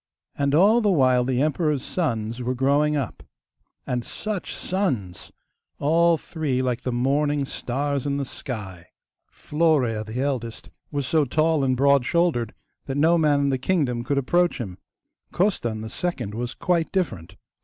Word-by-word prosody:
And 140 0 +1
all 210 +8 +5
the 210 - +2
while 130 -8 +4
the 130 +1 +1
emperor's 150 -2 0
sons 115 -8 -2
were 125 +1 -1
growing 145 +4 +2
up. 135 -6 -4 0.6
And 125 -1 -2
such 210 - -4
sons! 130 - -2 0.5
All 165 +3 +3
three 150 -6 -2
like 125 -2 -1
the 125 - -2
morning 140 +4 +1
stars 140 +2 -2
in 140 0 0
the 140 - -2
sky! 95 -10 -7 0.4
Florea, 145 -9 +1
the 110 +3 -6
eldest, 125 -5 -3 0.2
was 145 -2 -2
so 155 +3 +2
tall 155 +2 +1
and 130 -1 +1
broad 140 0 +4
shouldered 150 -8 +1 0.3
that 135 0 -2
no 160 +4 +4
man 150 -2 +3
in 140 - +2
the 130 -1 0
kingdom 130 -6 0
could 140 +3 -1
approach 175 +6 +2
him. 95 -7 -6 0.5
Costan, 120 - 0
the 110 - -5
second, 130 - -3
was 120 +2 -4
quite 170 -2 0
different. 170 - -2
140 Hz, 155 wpm, -24 LUFS, 125-160 Hz, 0.6 s, all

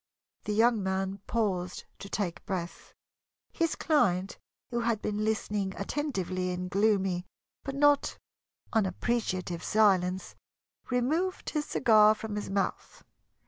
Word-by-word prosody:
The 210 - -1
young 225 0 +4
man 190 +1 -2
paused 185 -6 -1 0.2
to 200 - -8
take 190 -5 -3
breath. 175 -3 -5 0.6
His 330 -2 0
client, 195 - +1 0.3
who 240 - 0
had 230 -2 0
been 210 0 -2
listening 210 -3 -1
attentively 195 - -2
in 180 0 -3
gloomy 195 -3 +1 0.4
but 275 -1 -4
not 290 0 +3 0.6
unappreciative 190 -4 -1
silence, 190 -4 +2 0.6
removed 305 +10 0
his 300 -2 -1
cigar 215 -3 +5
from 220 -1 -5
his 210 - -4
mouth. 195 0 -2
205 Hz, 115 wpm, -29 LUFS, 185-235 Hz, 0.6 s, cigar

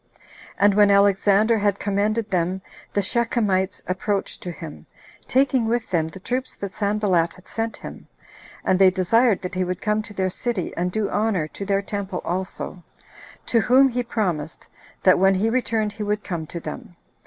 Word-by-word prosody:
And 205 0 +4
when 205 0 +5
Alexander 200 +2 +4
had 200 -1 +1
commended 210 +2 -1
them, 185 +1 0 0.3
the 200 - +1
Shechemites 205 -4 0
approached 195 +2 -2
to 180 - -5
him, 160 -2 -10 0.4
taking 260 -3 +2
with 230 0 -1
them 165 -3 +1
the 175 +4 -10
troops 255 +6 -3
that 200 0 -6
Sanballat 200 -5 +1
had 185 - -18
sent 225 0 -3
him, - - -10 0.6
and 185 - +2
they 190 -1 +7
desired 200 +4 +2
that 180 - -5
he 185 0 0
would 180 -1 -3
come 210 0 0
to 210 0 -10
their 190 -1 0
city, 225 -3 -3
and 180 +1 -1
do 215 +1 -1
honor 205 -7 0
to 200 - -7
their 200 0 +1
temple 200 -3 -4
also; 185 0 -4 0.6
to 230 - +2
whom 260 +5 +5
he 245 0 -1
promised, 180 -10 -3 0.4
that 185 - +5
when 195 +1 +4
he 215 +4 +1
returned 225 -4 0
he 210 +1 -9
would 210 0 -1
come 165 -4 -4
to 170 - -6
them. 165 +2 -8
200 Hz, 175 wpm, -23 LUFS, 185-220 Hz, 0.6 s, they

